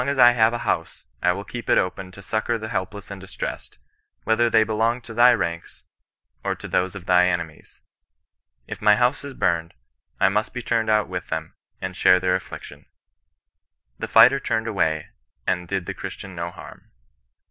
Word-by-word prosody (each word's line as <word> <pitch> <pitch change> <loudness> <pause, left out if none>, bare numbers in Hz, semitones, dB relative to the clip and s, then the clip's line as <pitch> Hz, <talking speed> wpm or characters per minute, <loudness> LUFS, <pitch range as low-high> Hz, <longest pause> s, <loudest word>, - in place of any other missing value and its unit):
as 140 - -1
I 120 -1 +8
have 115 -2 +3
a 120 - -2
house, 85 -1 -2 0.2
I 90 - +3
will 100 +3 -4
keep 120 +3 -8
it - - +5
open 95 0 -2
to 100 - -12
succour 110 +4 -1
the 110 0 -6
helpless 100 +1 -4
and 100 -1 -8
distressed, 95 - -6 0.5
whether 115 +1 +2
they 110 -1 +4
helong 115 +3 0
to 115 - -9
thy 120 +2 +6
ranLi, 85 -7 -3 0.6
or - - -1
to - - -9
those 90 0 0
of 95 -3 -9
thy 90 -1 +4
enemies. 85 -3 -5 0.8
If - - -8
my 105 0 +6
house 125 +4 +1
is 140 -2 -8
humed^ 85 -1 0 0.5
I 95 - +5
must 105 +5 -1
he 125 - -3
turned 115 -2 0
out 105 -1 +3
with 90 -1 -5
them, 80 0 -4 0.3
and 95 -1 -5
share 90 -1 +5
their 90 0 +1
afflic 95 - -6
tion." - - -13 1.1
The - - -3
fighter 135 - +6
turned 110 -4 -1
away 80 -8 0 0.4
and 90 -1 -1
did 95 -1 -2
the - - -4
Christian 95 -1 -8
no 85 0 -4
harm. - - -13
100 Hz, 190 wpm, -23 LUFS, 90-115 Hz, 1.1 s, I